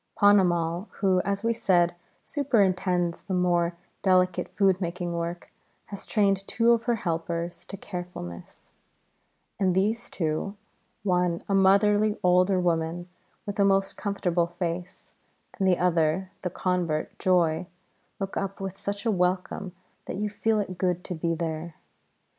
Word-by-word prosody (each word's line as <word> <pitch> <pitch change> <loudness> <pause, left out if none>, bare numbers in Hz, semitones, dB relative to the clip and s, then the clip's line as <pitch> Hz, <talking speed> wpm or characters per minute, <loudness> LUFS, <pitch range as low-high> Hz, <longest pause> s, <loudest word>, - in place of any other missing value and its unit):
Ponnamal, 180 -3 +3
who, 190 -2 +3
as 200 +1 -2
we 230 0 +2
said, 175 -6 +2 0.3
superintends 185 - +1
the 190 - -2
more 175 -1 +1 0.2
delicate 185 -2 +2
food 195 -2 +2
making 175 0 -3
work, 170 0 -4 0.3
has 200 - -8
trained 195 -2 +2
two 235 0 +3
of 230 -1 +2
her 240 -1 +2
helpers 170 -2 -3
to 195 - -7
carefulness; 175 - -8 0.9
and 185 -3 +2
these 215 +5 0
two 165 +4 -2 0.5
one 180 -3 +1
a 200 - 0
motherly 205 +2 +4
older 180 +1 +4
woman 170 0 -1 0.4
with 205 0 -5
a - - +6
most 195 0 +2
comfortable 180 -4 0
face, 175 0 -5 0.5
the 190 -2 +3
other 175 +1 +1
the 180 - -2
convert, 175 -4 -1
Joy 175 -2 +2 0.5
look 195 -1 -4
up 195 0 -3
with 195 0 -5
such 200 +2 -3
a 225 - +3
welcome 180 0 -1 0.3
that - - -5
you 210 0 -2
feel 220 +1 +1
it 185 -3 -4
good 180 -1 0
to 180 - -5
be 165 0 -1
there. 160 0 -4
185 Hz, 140 wpm, -27 LUFS, 175-200 Hz, 0.9 s, a